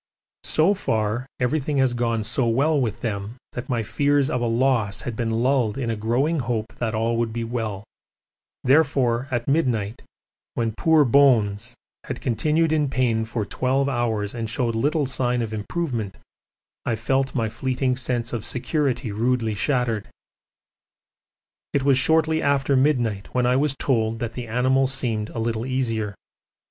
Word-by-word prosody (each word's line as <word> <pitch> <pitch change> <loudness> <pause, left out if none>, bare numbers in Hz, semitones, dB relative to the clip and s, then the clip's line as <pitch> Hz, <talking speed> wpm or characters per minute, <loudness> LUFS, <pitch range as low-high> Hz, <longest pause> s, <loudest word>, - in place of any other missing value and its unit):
So 165 +6 +3
far 115 - -1
everything 140 +3 0
has 130 -2 +3
gone 115 -2 0
so 115 +3 0
well 140 +6 +2
with 115 -2 -2
them 105 +1 -4 0.2
that 120 - -6
my 120 -3 0
fears 145 +5 +1
of 125 - -1
a 120 - +1
loss 115 -4 +1
had 120 - -5
been 115 0 -1
lulled 120 0 +1
in 120 -4 -1
a - - -1
growing 125 +9 0
hope 115 -2 -3
that 115 -2 -1
all 115 +1 0
would 115 -1 0
be 115 +1 -3
well 110 -4 -3 0.8
therefore 130 -3 +3
at 120 -2 -2
midnight, 125 -8 0 0.5
when 115 -2 -1
poor 160 0 +4
'Bones' 115 -6 +3 0.3
had - - -5
continued 155 +7 +1
in 150 -3 +1
pain 120 -4 +1
for 110 -2 -3
twelve 130 +5 0
hours 115 -6 -1
and 115 -2 -4
showed 115 +1 0
little 145 +6 +1
sign 125 -2 0
of 110 -1 -5
improvement, 110 - -3 0.7
I 115 - 0
felt 130 +4 0
my 115 -3 +1
fleeting 130 +3 -1
sense 120 -2 -2
of 115 -3 -2
security 130 -1 -1
rudely 115 +1 0
shattered. 115 -1 0 1.7
It 140 - +1
was 135 -2 +4
shortly 160 +2 +2
after 140 -1 +2
midnight 120 -7 +1
when 125 -1 +2
I 125 +1 +3
was 140 +1 +1
told 115 -4 0
that 115 0 -4
the 120 0 -6
animal 130 +3 +2
seemed 115 -5 -1
a - - -9
little 115 0 -1
easier. 115 -6 -1
120 Hz, 160 wpm, -23 LUFS, 115-135 Hz, 1.7 s, poor